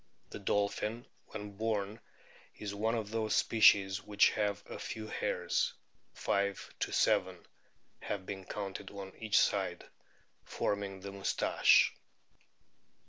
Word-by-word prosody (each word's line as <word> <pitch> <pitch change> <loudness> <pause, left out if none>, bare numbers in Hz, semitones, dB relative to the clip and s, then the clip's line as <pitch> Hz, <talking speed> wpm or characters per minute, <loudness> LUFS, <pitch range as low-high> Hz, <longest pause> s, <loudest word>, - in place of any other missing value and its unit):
The - - -6
dolphin 105 +4 -1 0.2
when 105 -1 -7
born 110 -1 -1 0.6
is 105 -1 -5
one 110 +3 0
of 110 -2 -3
those 110 -1 0
species 100 -3 +5
which 105 -1 +4
have 105 -1 -1
a - - -7
few 110 -1 -5
hairs; - - -1 0.4
5 100 0 -1
7 - - +1 0.5
have 95 -2 -4
been 95 0 -6
counted 95 -2 -5
on 100 -1 -8
each 110 -2 +2
side, - - +1 0.6
forming 100 -2 -2
the 100 +1 -6
"moustache." 100 0 +3
100 Hz, 115 wpm, -33 LUFS, 100-110 Hz, 0.6 s, species